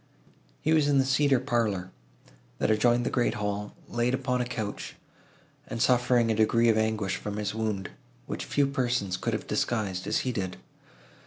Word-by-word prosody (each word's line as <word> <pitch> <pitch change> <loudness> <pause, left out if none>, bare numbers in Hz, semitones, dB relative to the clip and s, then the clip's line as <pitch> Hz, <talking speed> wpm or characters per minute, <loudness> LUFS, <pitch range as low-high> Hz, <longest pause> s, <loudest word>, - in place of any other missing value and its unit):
He 155 - +2
was 155 -2 +4
in 145 -1 +3
the 135 - +4
cedar 135 0 +3
parlour, 110 -8 -1 0.7
that - - +1
adjoined 120 +3 +3
the - - -1
great 120 -2 +1
hall, 105 -1 -3
laid 120 +2 0
upon 125 -1 -1
a - - 0
couch, 110 -4 -5 0.7
and 115 - -5
suffering 125 -1 +3
a - - +1
degree 115 +2 +3
of 110 - +4
anguish 110 -3 0
from 105 +1 -5
his 105 -1 -2
wound, 110 -4 -2 0.3
which - - -5
few 145 - +2
persons 120 -8 0
could - - -2
have - - -3
disguised, 100 -6 -1
as - - +1
he 130 - +1
did. 95 -5 -3
115 Hz, 175 wpm, -28 LUFS, 105-125 Hz, 0.7 s, was